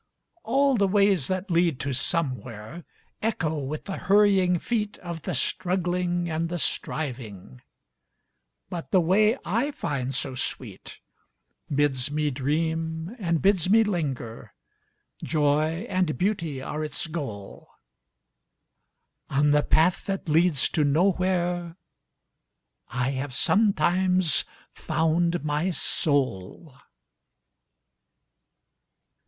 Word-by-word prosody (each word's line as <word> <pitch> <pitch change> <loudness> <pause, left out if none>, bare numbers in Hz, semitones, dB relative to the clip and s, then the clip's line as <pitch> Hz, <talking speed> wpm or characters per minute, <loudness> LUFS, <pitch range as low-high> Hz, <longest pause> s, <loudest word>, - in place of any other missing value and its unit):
All 270 +1 +2
the 200 -2 +3
ways 200 -6 +3
that 185 +1 -3
lead 170 -5 +2
to 140 - -2
SomewhereEcho 145 - -3
with 155 +2 -5
the 195 - -4
hurrying 195 -3 +4
feetOf 200 -6 -3
the 180 -1 -3
Struggling 175 +3 -1
and 165 0 -2
the 175 - -2
Striving, 115 - -4 1.1
But 170 -2 -6
the 190 - +4
way 210 +7 +3
I 235 +9 0
find 135 - -3
so 135 0 -2
sweetBids 130 - -4
me 150 0 0
dream 160 - -2
and 170 -5 0
bids 190 -3 +3
me 225 +2 +6
linger, 140 - -4 0.7
Joy 155 +4 +1
and 185 -4 0
Beauty 165 -8 -1
are 155 +2 -4
its 150 +1 -2
goal,—On 105 - -7
the 150 0 +4
path 165 +7 +2
that 195 -2 -3
leads 160 -2 +3
to 155 - +1
NowhereI 175 +2 +1 1.1
have 130 +2 -2
sometimes 185 -3 +2 0.3
found 170 +1 0
my 150 +4 0
soul! 140 - -1
165 Hz, 95 wpm, -26 LUFS, 140-185 Hz, 1.1 s, me